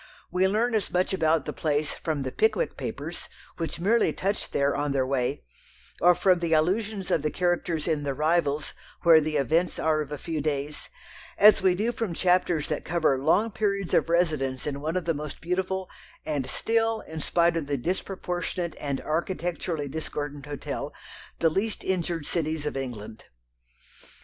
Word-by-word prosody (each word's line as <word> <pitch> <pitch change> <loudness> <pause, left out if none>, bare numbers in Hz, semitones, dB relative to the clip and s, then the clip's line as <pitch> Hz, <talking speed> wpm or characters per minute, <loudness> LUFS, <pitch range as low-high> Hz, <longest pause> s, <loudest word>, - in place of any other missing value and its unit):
We 185 +1 +3
learn 225 +5 +1
as 215 -3 0
much 180 +2 +1
about 160 -4 +2
the - - -4
place 150 -1 0
from 155 -4 -2
the 130 - -3
Pickwick 445 +2 +1
Papers, - - -5 0.3
which 165 -1 -3
merely 220 +7 +3
touch 200 +2 -2
there 140 0 +1
on 145 -1 -1
their 135 -2 +2
way, 130 0 -1 0.6
or 175 0 +6
from 185 -2 +3
the 170 -1 0
allusions 195 +5 +1
of 160 - +3
the 150 - 0
characters 175 -2 0
in 155 -3 +1
The 140 -2 -2
Rivals, 155 -1 +1 0.3
where 165 -2 +8
the 155 0 -1
events 160 +5 +1
are 155 -1 +2
of 150 -1 -6
a 150 - -3
few 160 0 -3
days, 145 0 -3 0.5
as 210 0 +7
we 185 -1 +4
do 215 +5 0
from 225 -8 -3
chapters 180 -4 +2
that 150 - -2
cover 160 -5 +1
long 210 +9 +3
periods 200 -3 -1
of - - +3
residence 155 -7 +1
in 140 -1 -3
one 160 +4 -1
of 180 - -2
the 165 - +2
most 150 -1 -6
beautiful, 185 +2 -2 0.4
and 145 -4 -1
still, 225 +3 +1
in 160 0 -7
spite 170 +2 +2
of 160 -4 -2
the 145 -1 0
disproportionate 180 +2 -3
and 140 -2 -2
architecturally 165 -1 -2
discordant 145 -1 -5
hotel, 145 -1 -4 0.5
the 165 - +3
least 210 +6 -1
injured 170 -4 -1
cities 155 -2 -1
of 150 - -2
England. 115 -5 -6
165 Hz, 175 wpm, -27 LUFS, 145-185 Hz, 0.6 s, where